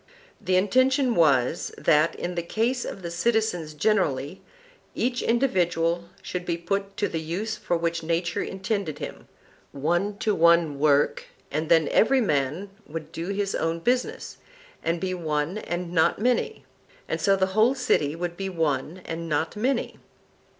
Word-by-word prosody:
The 185 - +1
intention 255 +7 +3
was, 145 - +2
that, 155 +2 +3
in 175 - -4
the 170 - -1
case 230 +8 -1
of 190 - -7
the 170 - -4
citizens 175 -5 0
generally, 155 -4 0 0.5
each 245 +1 0
individual 175 -8 +1 0.2
should 180 -1 -4
be 170 -1 -2
put 195 +3 -3
to 205 - +1
the 165 - -3
use 185 +8 -3
for 175 - -1
which 165 0 -1
nature 170 +1 -1
intended 190 -5 -3
him, - - -8 0.5
one 175 +8 0
to 215 0 +1
one 170 -4 +4
work, 145 -1 +3 0.3
and 155 +3 -2
then 165 -3 +5
every 265 +4 +4
man 155 - 0 0.2
would 155 0 -7
do 165 +1 -5
his 200 0 -1
own 165 +1 0
business, 250 +8 -1 0.5
and 165 +1 0
be 185 0 -2
one 160 +2 -2
and 175 -3 -4
not 160 -2 +3
many; 245 +3 0 0.4
and - - -2
so 195 -1 +4
the 190 0 0
whole 225 +6 +4
city 160 - +1
would 170 0 -4
be 195 +1 -4
one 160 0 -1
and 165 0 -5
not 155 +4 -1
many. 250 +6 -1
175 Hz, 155 wpm, -25 LUFS, 160-205 Hz, 0.5 s, then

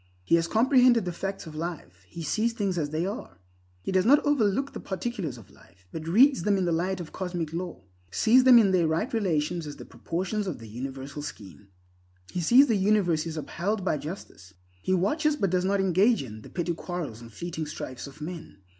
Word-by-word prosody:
He - - -1
has 170 0 +4
comprehended 245 +1 +4
the 180 - -2
facts 195 +3 -5
of 160 - -9
life; 155 - -6
he 165 - -8
sees 220 +9 0
things 195 -6 -1
as 145 -2 -1
they 155 +3 -1
are. 190 - -6 0.5
He - - -3
does 185 -1 +3
not 285 +7 +5
overlook 270 -1 +1
the - - -6
particulars 190 - -4
of 105 -4 -15
life, 95 +2 -22
but 160 0 -6
reads 245 - +5
them 200 +2 +2
in 190 - 0
the 170 - +1
light 185 +3 0
of 170 -3 -7
cosmic 175 -4 -4
law; 170 - -5 0.3
sees 235 - +4
them 255 -2 +8
in 210 -4 +5
their 175 -3 +3
right 165 +11 -1
relations 170 -6 0
as 145 - -7 0.3
portions 190 +4 -2
of 180 - -3
the 115 - -11
universal 135 +5 -6
scheme. 100 -8 -9 0.6
He 180 - -2
sees 245 - +7
the 230 - +1
universe 190 -5 +2
is 160 -1 -5
upheld 190 +6 -2
by 150 - +1
justice. 140 - -9 0.3
He - - -2
watches, 300 - +1
but 195 -10 0
does 180 0 +1
not 200 +1 +1
engage 195 - +3
in, 110 -4 -9
the - - -12
petty 175 -1 -2
quarrels 165 -9 -5
and 115 -1 -11
fleeting 160 +6 -5
strifes 130 -3 -6
of 140 +2 -14
men. 165 - -7
175 Hz, 210 wpm, -27 LUFS, 155-205 Hz, 0.6 s, them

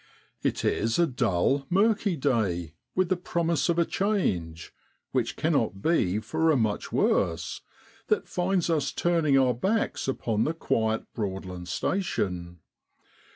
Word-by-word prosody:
It - - -1
is 115 +1 +1
a 170 - +5
dull, 130 - +1
murky 200 0 +2
day, 100 - 0 0.2
with 185 -1 +2
the 185 - +3
promise 170 -1 0
of 170 - +2
a 170 - +3
change 90 - -1 0.4
which - - 0
cannot 95 - 0
be 105 - +2
for 160 +10 0
a 155 - +4
much 110 -3 -1
worse 80 -1 0 0.5
that - - +1
finds 180 0 0
us 155 -5 +1
turning 165 -5 +2
our 130 -2 +4
backs 195 - -1
upon 115 -4 0
the 160 - -1
quiet 110 -7 0
Broadland 95 -4 -5
station. 90 - -2
135 Hz, 135 wpm, -27 LUFS, -, 0.5 s, a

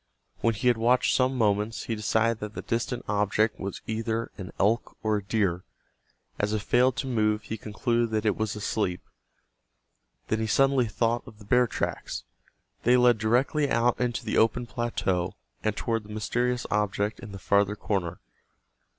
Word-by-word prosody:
When 115 -1 +1
he 105 - -1
had 120 -2 +4
watched 125 +2 +3
some 130 0 +2
moments 105 0 +1
he 115 - -3
decided 110 +1 +1
that 105 0 -6
the - - -5
distant 120 +2 -2
object 105 +1 +1
was 100 0 -5
either 115 +1 -2
an 95 -2 -7
elk 110 +4 +1
or 110 -1 +2
a 100 - -5
deer. 100 -4 0 0.8
As 105 +1 0
it 105 -1 -1
failed 125 +1 +3
to - - -2
move 105 -3 +1
he 110 - -4
concluded 115 +2 -1
that 110 0 -1
it 105 - +3
was 110 -1 -2
asleep. 105 -3 -1 1.3
Then 110 - 0
he 110 - -1
suddenly 135 +2 +3
thought 115 +2 0
of 110 - -12
the 105 - -14
bear 125 +4 +4
tracks. - - -3 0.6
They 125 +1 +4
led 125 -2 +5
directly 130 +7 +2
out 120 0 +2
into 120 -1 -1
the - - +1
open 115 +2 +2
plateau, 110 -7 -1 0.3
and 110 -1 0
toward 115 -1 -1
the - - -14
mysterious 120 +4 -1
object 105 0 0
in 110 - -9
the 100 - -7
farther 100 +1 +2
corner. 90 -5 -2
110 Hz, 175 wpm, -27 LUFS, 105-120 Hz, 1.3 s, led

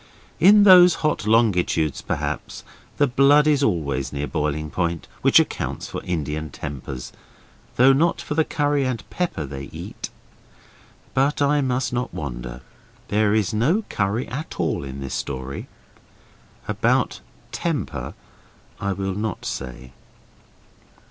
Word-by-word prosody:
In 205 +3 +7
those 180 -3 +8
hot 150 -8 0
longitudes, 90 - +2
perhaps, - - -4 0.3
the 145 - +4
blood 140 +3 +5
is 150 -2 +3
always 70 - 0
near 70 0 -3
boiling 75 +1 -2
point, 85 -2 -2
which - - +6
accounts - - -2
for - - -5
Indian 75 -2 -3
tempers, 70 -3 -7 0.6
though 130 +2 +6
not 165 +5 +2
for - - -4
the 160 +1 +3
curry 145 -2 0
and 130 -3 -3
pepper 175 - -2
they 70 0 -7
eat. - - -7 1.0
But 140 +2 +2
I 145 +1 +3
must 125 -2 -1
not 125 0 -2
wander; - - -6 0.5
there 105 0 +2
is 110 0 +1
no 150 - +2
curry 100 +5 -1
at 145 +5 -6
all - - 0
in 70 0 -7
this 65 - -5
story. 65 0 -4 1.0
About - - +1 0.3
temper - - -3 0.6
I 100 0 -1
will 95 0 -3
not 105 0 -4
say. 65 -1 -6
105 Hz, 130 wpm, -23 LUFS, -, 1.0 s, those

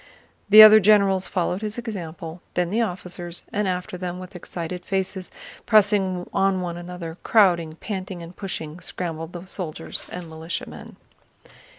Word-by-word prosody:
The 215 +1 +11
other 215 0 +10
generals 195 -2 +4
followed 180 0 -1
his 215 +1 -4
example, 175 -7 -6
then 180 0 0
the 225 +3 +1
officers, 180 -4 -4
and 205 -1 0
after 180 0 -3
them 180 -1 -4
with 185 +1 -10
excited 180 0 -6
faces, 190 -1 -2 0.4
pressing 200 -4 +3
on 195 -1 +2
one 175 -2 -3
another, 175 -1 -7
crowding, 175 -7 +3
panting, 185 -1 -6
and 170 +2 -11
pushing, 165 -5 -5
scrambled 165 -2 -5
the 175 +1 -7
soldiers 165 -4 -5
and 180 -1 -6
militiamen. 160 +1 -7
180 Hz, 145 wpm, -24 LUFS, 175-195 Hz, 0.4 s, The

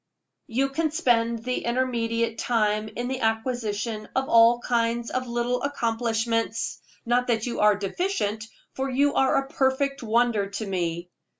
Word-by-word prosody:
You 265 +4 0
can 315 +3 0
spend 235 -7 +1
the 250 +1 -2
intermediate 230 -2 -1
time 215 -2 +1
in 240 +1 -3
the 260 0 -3
acquisition 225 -2 -2
of 265 0 0
all 230 +1 +6
kinds 235 -1 0
of 255 0 -2
little 240 +1 -1
accomplishments; 230 -3 -1 0.2
not 245 +1 +1
that 225 -2 +1
you 240 - -3
are 210 0 +5
deficient, 215 - -2 0.3
for 265 +1 -2
you 280 +2 +2
are 265 - +3
a 275 - +1
perfect 275 +1 0
wonder 230 -3 +1
to 200 +2 -4
me. 175 -2 -3
235 Hz, 145 wpm, -25 LUFS, 225-255 Hz, 0.3 s, all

